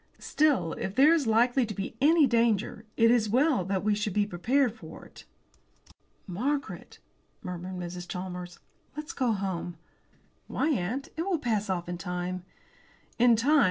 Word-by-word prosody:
Still, 275 - +1
if 190 +1 -4
there 290 +6 +6
is 305 -7 +1
likely 245 +4 +3
to 215 -3 -4
be 195 +4 -5
any 310 +2 +6
danger 230 -2 +1
it 230 0 +5
is 235 -3 +3
as - - -5
well 260 - +3
that 190 0 -1
we 210 0 +2
should 210 -1 -2
be 205 +1 +2
prepared 235 +7 +1
for - - -11
it." - - -15 1.0
"Margaret," 270 - -3 0.5
murmured 180 +1 -6
Mrs. 180 0 -6
Chalmers, 180 -1 -6 0.4
"let's 300 0 -6
go 255 -3 0
home." 185 -4 -3 0.7
"Why, 305 - 0
aunt? 250 +3 -2
It - - -1
will 365 0 0
pass 220 -7 -1
off 175 -2 -2
in 175 -1 -5
time." 180 +1 -4 0.8
In 240 0 +6
time! 285 +7 +3
215 Hz, 160 wpm, -28 LUFS, 180-260 Hz, 1.0 s, there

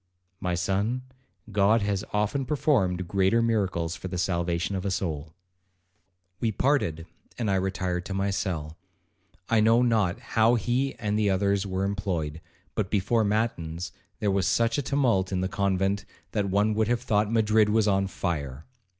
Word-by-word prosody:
'My 90 -1 -1
son, 100 +7 -1 0.5
God 105 +2 +3
has 100 -1 -1
often 105 +6 0
performed 125 - +1
greater 95 +4 +2
miracles 95 -8 0
for - - -7
the 90 0 -4
salvation 85 0 -1
of 95 - -3
a 100 - -1
soul.' 80 -5 -3 1.0
'We 110 -2 0
parted, 90 - +1 0.3
and 110 -4 0
I - - +2
retired 95 -1 -1
to 95 - -4
my 100 +1 0
cell. 85 -6 -3 0.7
I 115 - +3
know 115 +3 +5
not 110 -7 +2
how 110 +2 +3
he 125 +4 0
and 105 -2 -1
the 105 -2 +2
others 100 +1 +1
were 95 0 -2
employed, 90 -6 -2 0.3
but, 105 -4 -1
before 110 +3 +2
matins, 90 -6 -1 0.3
there 105 -4 +1
was 95 -1 +1
such 115 +5 +2
a - - +1
tumult 125 -9 +1
in 95 -1 0
the 95 - 0
convent, 100 +1 0 0.3
that 100 -2 0
one 105 +3 +2
would 110 0 +1
have 120 +1 0
thought 105 -3 +1
Madrid 110 -1 +3
was 110 0 +3
on 95 -1 +2
fire. 80 -6 -4
100 Hz, 165 wpm, -27 LUFS, 95-110 Hz, 1.0 s, know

